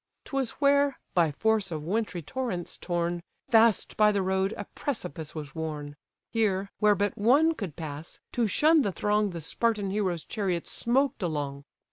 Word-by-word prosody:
'Twas 270 -4 -1
where, 280 -1 +3 0.2
by 170 -4 +3
force 215 +3 +1
of 155 -2 -4
wintry 190 -1 -2
torrents 195 - -3
torn, 175 -1 -2 0.3
Fast 225 -2 +4
by 210 0 +6
the 200 -2 0
road 190 +1 +1
a 205 - -5
precipice 165 - -4
was 150 -3 -6
worn: 150 -2 -5 0.4
Here, 200 -4 0
where 210 -1 +5
but 205 +1 0
one 285 +10 +5
could 195 - -6
pass, 155 -1 -7
to 235 -2 +1
shun 310 +9 +4
the 205 - 0
throng 210 +2 +1
The 170 -3 -6
Spartan 205 +4 0
hero's 185 -5 -1
chariot 185 -6 -2
smoked 265 +2 +1
along. 145 -5 -3
200 Hz, 160 wpm, -28 LUFS, 170-225 Hz, 0.4 s, by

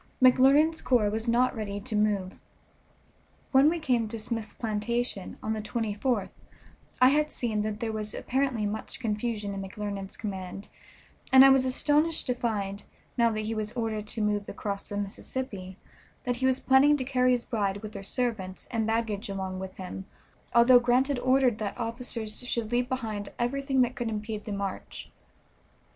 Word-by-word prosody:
McClernand's 275 +5 +5
corps 225 -5 +2
was 220 +2 -2
not 250 +2 +3
ready 205 -2 -4
to 220 +1 -4
move. 205 -3 0 1.1
When 270 +2 +6
we 340 - 0
came 250 -8 +1
to 230 +2 -5
Smith's 225 0 -3
plantation, 225 -1 -2
on 220 - -1
the 215 - -3
24th, 220 0 -1 0.7
I 255 - +7
had 300 +2 +2
seen 220 -4 -1
that 215 0 -3
there 225 -1 -1
was 215 -1 -3
apparently 260 -4 0
much 210 +1 -4
confusion 215 -3 -2
in 195 - -4
McClernand's 195 0 -5
command, 195 -2 -6 0.6
and 265 0 +9
I - - +9
was 265 -1 +4
astonished 295 +5 +2
to 250 - +1
find, 205 -5 -2 0.3
now 235 -2 +4
that 215 -1 -2
he 215 +1 -3
was 215 0 -3
ordered 220 -3 -2
to 220 - -3
move 205 -1 0
across 200 -1 -5
the 205 - -4
Mississippi, 200 -1 -5 0.5
that 245 -3 -1
he 260 +1 +1
was 260 0 +2
planning 280 +3 +5
to 260 - -2
carry 255 -1 +2
his 245 -1 0
bride 205 -3 -1
with 215 - -7
her - - -6
servants, 200 -4 -3
and 225 -2 0
baggage 225 -2 -1
along 190 -1 -4
with 190 0 -7
him, 190 0 -7 0.5
although 245 +1 +8
Grant 245 +3 +2
had 280 -3 0
ordered 255 -3 +3
that 210 -2 -3
officers 230 -2 -3
should 235 -3 -3
leave 245 +1 +1
behind 220 -6 -3
everything 270 +2 +1
that 250 0 +2
could 240 -2 -2
impede 215 -1 -4
the 210 - -5
march. 200 -1 -5
225 Hz, 175 wpm, -28 LUFS, 210-255 Hz, 1.1 s, and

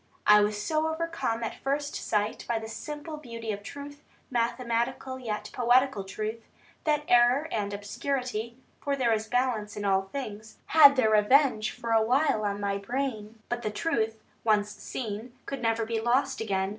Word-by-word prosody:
I 210 0 +8
was 210 0 0
so 310 +8 0
overcome 320 -8 -2
at 225 - -5
first 285 +2 -1
sight 210 0 -1
by 235 - +1
the 220 0 -5
simple 300 +6 -6
beauty 230 -6 -6
of 205 -1 -5
truth, 285 +6 -9 0.3
mathematical 240 +2 -1
yet 220 -4 -4
poetical 245 -3 +3
truth, 215 +4 -4 0.4
that 300 -1 +2
error 245 +5 +5
and 205 -2 -1
obscurity 235 +2 -3 0.2
(for 280 -1 -1
there 245 -4 +2
is 220 0 -1
a - - -23
balance 240 -5 0
in 205 - -3
all 195 -1 +3
things) 215 0 -7
had 285 -3 +8
their 235 -5 +3
revenge 215 +1 +4
for 235 -2 -5
a 225 0 +5
while 250 0 +2
on 200 0 -1
my 200 -1 -1
brain. 225 -1 -3
But 240 0 -2
the 215 - -1
truth, 225 -2 -1 0.3
once 210 -2 +2
seen, 225 +2 -6
could 275 - -5
never 225 -1 +1
be 225 0 -2
lost 255 +3 +1
again. 190 -3 0
230 Hz, 170 wpm, -28 LUFS, 215-265 Hz, 0.4 s, I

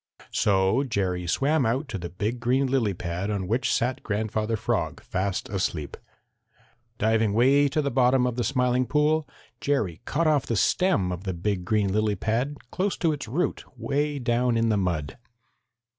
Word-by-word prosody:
So 95 +5 +2
Jerry 95 -8 -2
swam 140 - +2
out 130 +6 0
to 100 - -4
the 85 0 -5
big 105 +7 -3
green 130 +3 +2
lily 125 -7 +1
pad 85 +3 -3
on 100 -3 -2
which 120 +5 0
sat 130 +3 0
Grandfather 110 +1 -1
Frog - - -1
fast 95 +1 -2
asleep. 90 -7 -2 1.0
Diving 110 -1 +2
way 135 +6 +4
to 145 +2 0
the 140 - -1
bottom 125 0 +3
of 125 -2 -1
the 120 - -1
Smiling 125 -1 +1
Pool, 150 +3 +2 0.3
Jerry 110 - -1
cut 165 +4 0
off 150 -3 +2
the 115 - 0
stem 110 - +2
of 90 +1 -5
the 95 -3 -3
big 90 +1 -2
green 100 -1 +1
lily 105 0 +1
pad 115 +8 -1
close 190 +2 -1
to 165 - +1
its 145 -4 -6
root 155 +11 -1
way 145 +5 -1
down 120 -1 +1
in 115 0 +2
the 110 - +2
mud. 85 - -2
115 Hz, 175 wpm, -26 LUFS, 100-135 Hz, 1.0 s, way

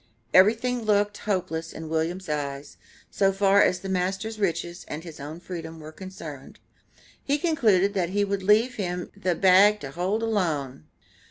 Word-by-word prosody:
Everything 230 +6 +4
looked 205 -1 +1
hopeless 165 -4 -2
in 160 0 -8
William's 165 +4 -2
eyes, 145 -1 -4 0.3
so 195 -1 +2
far 195 +1 +4
as 180 - +2
the 195 - -6
master's 190 +4 -2
riches 175 -2 -2
and 150 +2 -6
his 165 -4 -10
own 150 +4 -7
freedom 165 -2 -7
were 155 0 -9
concerned. 160 -6 -10 0.7
He 285 +1 +1
concluded 220 - +2
that 180 -4 0
he 205 +2 +1
would 200 -1 -2
leave 215 +6 +3
him 180 -3 -3
the 185 -3 -1
"bag 195 +4 +5
to 135 - -6
hold 190 +8 -1
alone." 155 - -1
185 Hz, 160 wpm, -25 LUFS, 160-205 Hz, 0.7 s, bag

